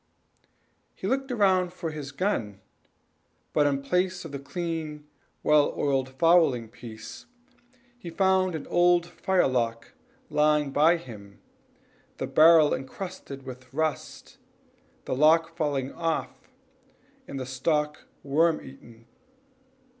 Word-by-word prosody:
He -, -, -8 dB
looked 270 Hz, +1 st, -1 dB
round 190 Hz, -6 st, +2 dB
for 165 Hz, -3 st, -5 dB
his 145 Hz, -2 st, -7 dB
gun, 125 Hz, -, -2 dB, 0.9 s
but 145 Hz, -1 st, +3 dB
in 140 Hz, -1 st, -1 dB
place 180 Hz, +4 st, -1 dB
of -, -, -8 dB
the 140 Hz, -, -5 dB
clean, 155 Hz, -1 st, -5 dB, 0.4 s
well 150 Hz, -1 st, +3 dB
oiled 135 Hz, -2 st, 0 dB
fowling 135 Hz, -5 st, +3 dB
piece, 115 Hz, -2 st, -11 dB, 0.7 s
he 180 Hz, -, -8 dB
found 185 Hz, 0 st, +2 dB
an 155 Hz, -, -6 dB
old 175 Hz, 0 st, +3 dB
firelock 130 Hz, -, -1 dB, 0.4 s
lying 150 Hz, -1 st, +2 dB
by 160 Hz, +5 st, +4 dB
him, 105 Hz, -10 st, -12 dB, 0.8 s
the -, -, -3 dB
barrel 160 Hz, -1 st, +6 dB
incrusted 140 Hz, -1 st, -7 dB
with 130 Hz, -1 st, -10 dB
rust, 155 Hz, +1 st, -4 dB, 0.7 s
the -, -, -2 dB
lock 165 Hz, +3 st, +4 dB
falling 145 Hz, -5 st, -1 dB
off, 165 Hz, -2 st, -3 dB, 0.8 s
and 135 Hz, -, -6 dB
the 130 Hz, -, -4 dB
stock 150 Hz, +4 st, -1 dB, 0.2 s
worm 155 Hz, +3 st, +2 dB
eaten. 120 Hz, -4 st, -14 dB
150 Hz, 115 wpm, -26 LUFS, 135-170 Hz, 0.9 s, barrel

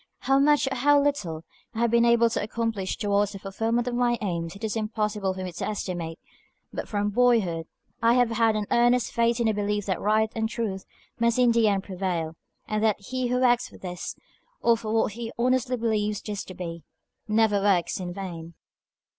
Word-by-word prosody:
How 270 Hz, 0 st, +3 dB
much, 295 Hz, +1 st, +4 dB
or 265 Hz, -, -2 dB
how 290 Hz, +3 st, +5 dB
little, 205 Hz, -, -1 dB, 0.3 s
I -, -, -3 dB
have 235 Hz, -1 st, +2 dB
been 235 Hz, 0 st, +4 dB
able 235 Hz, 0 st, +5 dB
to -, -, -1 dB
accomplish 220 Hz, -3 st, -2 dB
towards 205 Hz, 0 st, +1 dB
the -, -, -6 dB
fulfilment 225 Hz, +5 st, -1 dB
of 245 Hz, -, -1 dB
my 240 Hz, 0 st, +2 dB
aims 170 Hz, -3 st, -3 dB
it 200 Hz, -, -12 dB
is 220 Hz, 0 st, -2 dB
impossible 210 Hz, -3 st, -1 dB
for 185 Hz, -, -5 dB
me 185 Hz, -, -4 dB
to 170 Hz, -, -4 dB
estimate, 175 Hz, -6 st, -4 dB, 0.6 s
but -, -, -4 dB
from 205 Hz, -1 st, -1 dB
boyhood 205 Hz, -9 st, +2 dB, 0.3 s
I 230 Hz, +1 st, +4 dB
have 245 Hz, -2 st, +3 dB
had 225 Hz, -1 st, +2 dB
an 210 Hz, -1 st, -1 dB
earnest 240 Hz, 0 st, +3 dB
faith 235 Hz, 0 st, +1 dB
in 235 Hz, -, +1 dB
the 220 Hz, -, +3 dB
belief 205 Hz, 0 st, -1 dB
that 190 Hz, -3 st, -2 dB
right 215 Hz, +1 st, +2 dB
and 220 Hz, -1 st, -1 dB
truth 215 Hz, -5 st, -3 dB, 0.3 s
must 235 Hz, 0 st, +2 dB
in 250 Hz, -1 st, +5 dB
the 230 Hz, -1 st, +3 dB
end 200 Hz, -2 st, +1 dB
prevail, 180 Hz, -4 st, -3 dB, 0.3 s
and 215 Hz, 0 st, -1 dB
that 215 Hz, -2 st, +2 dB
he 250 Hz, +5 st, -3 dB
who 250 Hz, +1 st, 0 dB
works 245 Hz, -1 st, +3 dB
for -, -, -14 dB
these, 180 Hz, -2 st, -6 dB, 0.4 s
or 235 Hz, -, +4 dB
for 220 Hz, -1 st, -5 dB
what 220 Hz, -1 st, +2 dB
he 230 Hz, +2 st, -6 dB
honestly 255 Hz, +1 st, +1 dB
believes 215 Hz, -2 st, 0 dB
these 205 Hz, -2 st, -5 dB
to 185 Hz, -, -10 dB
be, 170 Hz, -2 st, -6 dB, 0.4 s
never 215 Hz, -2 st, +3 dB
works 195 Hz, -4 st, +2 dB
in 180 Hz, -1 st, -4 dB
vain. 170 Hz, -3 st, -7 dB
215 Hz, 205 wpm, -26 LUFS, 195-235 Hz, 0.6 s, how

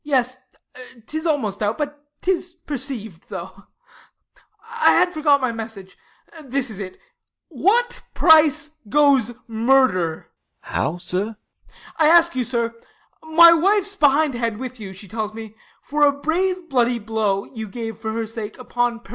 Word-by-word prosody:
Yes, 255 Hz, -3 st, 0 dB, 0.7 s
'tis 315 Hz, +6 st, -4 dB
almost 220 Hz, -, -1 dB
out, 210 Hz, +1 st, 0 dB
but 290 Hz, -1 st, -5 dB, 0.2 s
'tis 360 Hz, -1 st, 0 dB
perceiv'd, 245 Hz, -, -5 dB
though. -, -, -8 dB, 1.0 s
I 460 Hz, 0 st, +3 dB
had 360 Hz, +1 st, +3 dB
forgot 295 Hz, -3 st, +3 dB
my 255 Hz, -2 st, 0 dB
message; 220 Hz, -4 st, -8 dB, 0.5 s
this 265 Hz, -2 st, -2 dB
it 205 Hz, -, -9 dB
is: -, -, -4 dB
I 185 Hz, -1 st, -6 dB
oo -, -, -25 dB, 0.5 s
What 400 Hz, -, +1 dB
price 315 Hz, -1 st, +4 dB
goes 280 Hz, -4 st, +4 dB, 0.2 s
murder? 225 Hz, -8 st, +1 dB, 0.3 s
DeF. -, -, -14 dB
How, 170 Hz, -, -1 dB
sir? 190 Hz, +5 st, -4 dB
Ah. -, -, -35 dB, 0.3 s
I 310 Hz, -, +5 dB
ask 340 Hz, 0 st, +5 dB
you, 255 Hz, -, 0 dB
sir; 235 Hz, -1 st, -2 dB, 0.5 s
My 335 Hz, +2 st, +7 dB
wife's 400 Hz, +4 st, +2 dB
behindhand 275 Hz, -, +2 dB
with 255 Hz, 0 st, -7 dB
you, 200 Hz, -3 st, -7 dB
she 195 Hz, +2 st, -11 dB
tells 215 Hz, +1 st, -4 dB
me, 220 Hz, -1 st, -8 dB, 0.3 s
For 300 Hz, +1 st, -3 dB
a 290 Hz, -1 st, +6 dB
brave 360 Hz, +4 st, -1 dB
bloody 245 Hz, -4 st, +1 dB
blow 215 Hz, -3 st, -1 dB
you 220 Hz, -3 st, -8 dB
gave 225 Hz, 0 st, -6 dB
for 220 Hz, -1 st, -4 dB
her 225 Hz, 0 st, -2 dB
sake 220 Hz, -1 st, -7 dB
Upon 240 Hz, -1 st, -2 dB
Piracquo. -, -, -20 dB
255 Hz, 155 wpm, -21 LUFS, 220-310 Hz, 1.0 s, My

